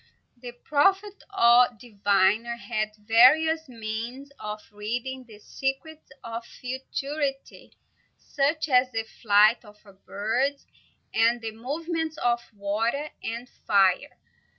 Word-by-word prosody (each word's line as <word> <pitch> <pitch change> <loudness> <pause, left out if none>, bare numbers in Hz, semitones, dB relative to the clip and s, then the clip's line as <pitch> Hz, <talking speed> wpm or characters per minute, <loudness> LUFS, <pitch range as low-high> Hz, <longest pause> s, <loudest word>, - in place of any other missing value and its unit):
The 245 0 -10
prophet, 385 +11 +1 0.2
or 240 +1 +7
diviner, 205 +1 +1
had 215 -3 -3
various 280 +9 +4
means 235 +4 -6
of 210 0 -6
reading 245 +5 -5
the 215 -2 -13
secrets 270 +7 -5
of 230 0 -6
futurity, 270 +3 -5 0.4
such 300 +2 -1
as 255 -2 +3
the 225 -1 -2 0.2
flight 210 +2 +5
of 210 -1 -16 0.3
birds, 250 +8 -1 0.5
and 230 +2 +3
the 225 -1 -5
movements 315 +7 -4
of 240 -3 +1
water 225 +8 -2
and 235 +2 -5
fire. 200 +5 +1
240 Hz, 105 wpm, -26 LUFS, 220-280 Hz, 0.5 s, or